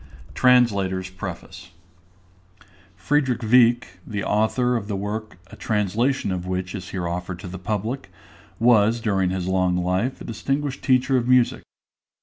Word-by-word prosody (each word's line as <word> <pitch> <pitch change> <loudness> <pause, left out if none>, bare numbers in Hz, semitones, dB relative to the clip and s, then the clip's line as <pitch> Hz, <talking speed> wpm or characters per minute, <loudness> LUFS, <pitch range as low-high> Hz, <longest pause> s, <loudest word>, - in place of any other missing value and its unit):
_ - - -17
TRANSLATOR'S 100 -8 +2
PREFACE. 90 -1 -8 1.3
FRIEDRICH 130 +5 0
WIECK, 120 +1 +4 0.2
the 100 -2 -3
author 125 +4 +1
of 105 -4 -3
the 105 - -2
work 105 +1 -5
a - - -10
translation 110 +3 0
of 90 -1 -4
which 90 0 -3
is 95 -3 -7
here 90 -3 -3
offered 90 +1 -4
to 90 - -9
the 90 +1 -7
public, 110 +7 -3 0.5
was 115 -1 +4
during 95 -5 0
his 95 -1 -2
long 90 -1 +1
life 90 +8 -1
a - - -9
distinguished 135 +5 -3
teacher 130 0 +3
of 120 -1 -1
music. 125 -1 +3
105 Hz, 145 wpm, -23 LUFS, 95-125 Hz, 1.3 s, WIECK